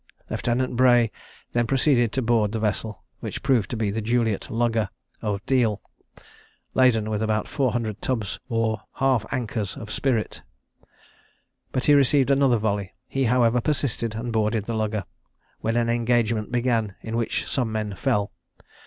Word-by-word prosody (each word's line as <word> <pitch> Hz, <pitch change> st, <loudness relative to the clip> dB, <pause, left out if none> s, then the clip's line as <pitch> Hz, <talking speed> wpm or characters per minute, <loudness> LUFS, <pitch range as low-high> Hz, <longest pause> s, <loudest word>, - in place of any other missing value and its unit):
Lieutenant 125 Hz, +1 st, 0 dB
Bray 120 Hz, -2 st, +5 dB, 0.4 s
then 120 Hz, -1 st, +1 dB
proceeded 130 Hz, -4 st, +3 dB
to 130 Hz, -, 0 dB
board 110 Hz, -2 st, +2 dB
the 110 Hz, -, -1 dB
vessel, 110 Hz, 0 st, -2 dB, 0.2 s
which -, -, -6 dB
proved 120 Hz, -8 st, +2 dB
to 120 Hz, -, -3 dB
be 110 Hz, -2 st, 0 dB
the 110 Hz, +2 st, -2 dB
Juliet 115 Hz, -2 st, 0 dB
lugger, 115 Hz, -3 st, +1 dB, 0.3 s
of 105 Hz, -2 st, -2 dB
Deal, 115 Hz, -6 st, +2 dB, 0.9 s
(laden 120 Hz, -5 st, +4 dB
with 105 Hz, -1 st, -1 dB
about 110 Hz, -1 st, 0 dB
four 135 Hz, -4 st, 0 dB
hundred 110 Hz, -4 st, -2 dB
tubs 115 Hz, -7 st, -2 dB
or 115 Hz, -2 st, 0 dB
half 130 Hz, -5 st, +1 dB
ankers 110 Hz, -6 st, -3 dB
of 105 Hz, -2 st, -8 dB
spirits,) 120 Hz, -6 st, -1 dB, 1.3 s
but 130 Hz, -, -1 dB
he 145 Hz, -, +6 dB
received 140 Hz, -1 st, +4 dB
another 135 Hz, -3 st, +4 dB
volley: 100 Hz, -2 st, -2 dB
he 135 Hz, -1 st, 0 dB
however 120 Hz, 0 st, +3 dB
persisted, 120 Hz, -5 st, -1 dB
and 115 Hz, +1 st, -4 dB
boarded 110 Hz, -1 st, +1 dB
the 115 Hz, -, -3 dB
lugger, 110 Hz, -2 st, -1 dB, 0.6 s
when 115 Hz, +1 st, 0 dB
an 120 Hz, -1 st, +2 dB
engagement 115 Hz, -2 st, +1 dB
began, 120 Hz, -4 st, 0 dB
in 115 Hz, 0 st, -4 dB
which 115 Hz, -1 st, -1 dB
some 125 Hz, -4 st, -1 dB
men 110 Hz, -2 st, -2 dB
fell. 100 Hz, +2 st, 0 dB
115 Hz, 155 wpm, -24 LUFS, 110-125 Hz, 1.3 s, he